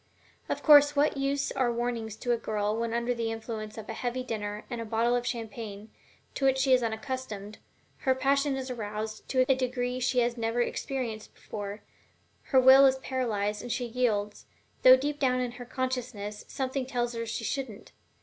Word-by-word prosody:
Of - - -2 0.4
what 295 +2 +3
use 275 0 -1
are 255 -3 +1
warnings 235 -2 -3
to 245 +2 -2
a 240 - +3
girl, 210 -1 -1
when 230 0 -2
under 235 +1 0
the 230 -1 -2
influence 220 -1 -6
of 220 - -7
a - - -4
heavy 245 +2 -3
dinner 210 -3 -4
and 240 -2 -5
a - - -3
bottle 230 +2 +1
of 245 0 -1
champagne, 220 -2 -6 0.4
to - - -5
which 265 0 +4
she 265 0 +3
is 255 - +5
unaccustomed, 220 -3 -4 0.4
her 260 -2 +1
passion 275 +1 +1
is 260 -1 -4
aroused 215 -1 -5
to 255 -1 +3
a 270 - +5
degree 250 -1 -2
she 250 0 +2
has 240 0 0
never 230 +1 -1
experienced 240 -3 -3
before, 205 0 -7 0.6
her 265 - +4
will 265 +2 +8
is 265 - +3
paralyzed 220 -6 -2
and 245 - -6
she 245 +1 -1
yields, 225 -4 -1 0.3
though 255 0 +9
deep 290 +2 -3
down 255 -2 +2
in 250 -1 -1
her 245 0 -9
consciousness 245 -5 -4
something 260 -1 -3
tells 245 -2 -1
her 230 0 -4
she 230 +1 -3
shouldn't? 240 -4 -4
240 Hz, 185 wpm, -29 LUFS, 220-260 Hz, 0.6 s, though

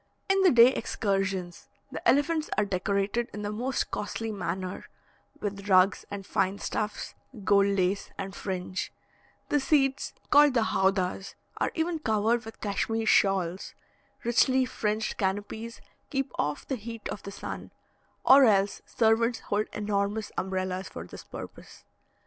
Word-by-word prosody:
In 390 0 +3
the 380 - +7
day 240 0 +7
excursions, 195 -6 -2 0.2
the - - -5
elephants 310 +3 +2
are 210 - +3
decorated 200 +4 -1
in 210 - -5
the 205 - -2
most 245 +5 -2
costly 225 +2 -3
manner 185 -2 -4 0.5
with 200 -1 -5
rugs 185 +1 +4
and 200 -1 -6
fine 190 +2 0
stuffs, 210 +1 -3 0.3
gold 200 +1 +4
lace, 195 0 0
and 195 0 -5
fringe; 185 -1 -4 0.6
the 290 - +3
seats 270 -1 +1 0.2
called 290 -2 +6
the 230 - +4
howdahs 190 -2 0 0.2
are - - 0
even 325 0 -1
covered 225 -2 +1
with 225 - -10
Cashmere 220 +2 -1
shawls; 190 -4 +2 0.5
richly 255 +2 +3
fringed 215 -2 -2
canopies 205 +3 -3 0.3
keep 270 -2 -2
off 150 0 -1
the 265 - -2
heat 230 0 -7
of 205 - -5
the - - -7
sun, - - -7 0.6
or 270 0 +8
else 200 -3 +2
servants 230 +1 +2
hold 210 +1 +1
enormous 205 0 -1
umbrellas 185 0 -2
for 85 - -8
this - - -10
purpose. - - -10
210 Hz, 140 wpm, -28 LUFS, 195-235 Hz, 0.6 s, or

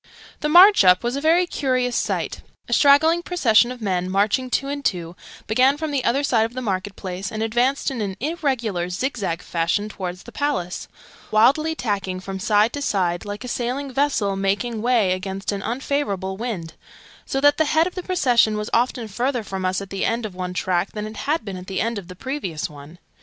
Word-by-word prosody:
The 300 - -1
'march 365 - +8
up' 180 +2 +5
was 240 +2 -1
a 280 - -3
very 335 +4 +4
curious 255 -6 -1
sight: - - -1
{Image...The - - -15
march - - -35
up} - - -24
a - - 0
straggling 315 +4 +5
procession 245 -10 +3
of 250 -3 -8
men, 185 -2 -1
marching 205 +7 +1
two 275 +2 0
and 285 0 -4
two, 175 -5 -2 0.3
began 255 +6 +3
from 315 0 -3
the 275 -3 -1
other 265 +5 +1
side 235 -5 +3
of 230 +2 -4
the 255 - -3
market 195 -2 -2
place, 190 +1 -5
and 220 0 -3
advanced 245 +6 +1
in 245 -4 -4
an 195 -2 -3
irregular 245 - -1
zig 255 +10 -2
zag 180 -5 -3
fashion 170 +5 -1
towards 180 -3 -6
the - - -12
Palace, 185 -12 -2 0.4
wildly 280 +9 +3
tacking 195 -7 -2
from 190 0 -6
side 215 +2 +2
to 285 - -4
side, 180 -7 0
like 205 +2 -6
a - - -6
sailing 255 +3 -3
vessel 245 -8 +1
making 200 +4 -1
way 230 -5 +2
against 190 +2 -3
an 200 -1 -3
unfavourable 220 -5 -2
wind 195 -7 -5 0.5
so 270 - -1
that 290 +1 +4
the 315 - +3
head 315 +2 +3
of 360 - -4
the 365 - -4
procession 245 - +2
was 210 +1 -4
often 240 -1 +1
further 245 +3 -1
from 190 -2 -5
us 185 +1 0
at 195 - -9
the 195 - -2
end 230 0 0
of 210 - -6
one 180 0 -5
tack 185 0 0
than 210 -1 -4
it 215 0 -8
had 295 +2 -1
been 195 -3 -5
at 180 0 -10
the 190 -1 -3
end 230 -1 -1
of 185 - -12
the 180 - -10
previous 190 - -4
one. 150 +3 -13
220 Hz, 220 wpm, -22 LUFS, 190-270 Hz, 0.5 s, march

